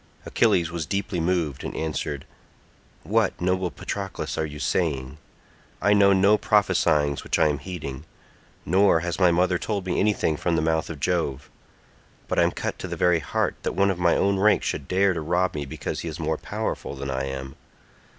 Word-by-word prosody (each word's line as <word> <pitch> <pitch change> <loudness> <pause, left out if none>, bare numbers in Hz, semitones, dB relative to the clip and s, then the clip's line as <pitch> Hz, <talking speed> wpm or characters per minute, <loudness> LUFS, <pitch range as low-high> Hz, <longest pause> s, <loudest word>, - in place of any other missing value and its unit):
Achilles 85 -2 +2
was 85 -3 -4
deeply 100 -2 -2
moved 85 -5 -1
and - - -5
answered, 75 -2 -3 0.8
"What, - - +1
noble 90 +1 0
Patroclus, 100 +2 -5
are 80 - -1
you 75 0 -9
saying? 70 -1 -1 0.6
I 105 +2 +3
know 100 -1 +5
no 100 +2 +4
prophesyings 75 -9 +2
which - - -1
I 75 - +4
am 70 -2 -1
heeding, 75 -5 -7 0.6
nor 95 -1 +4
has 85 +1 -3
my 90 -2 +5
mother 90 +1 +2
told 100 -4 -3
me 90 - -1
anything 100 -7 +1
from 85 +2 0
the 80 - +1
mouth 80 -1 0
of 80 -3 -6
Jove, 75 -4 -1 0.8
but - - 0
I - - +6
am - - +3
cut - - -4
to - - -5
the - - -4
very 90 -2 +3
heart 70 - -1
that - - -2
one 100 0 +3
of 90 - -4
my 85 -1 +3
own 100 -1 +2
rank 105 +2 +4
should 70 - -3
dare 95 +1 +3
to 85 - -3
rob 90 +4 0
me 75 -2 -4
because - - -5
he - - -5
is 80 0 -6
more 80 -1 -1
powerful - - -4
than 70 0 -4
I 65 +1 -2
am. 65 0 -6
85 Hz, 195 wpm, -25 LUFS, 75-95 Hz, 0.8 s, I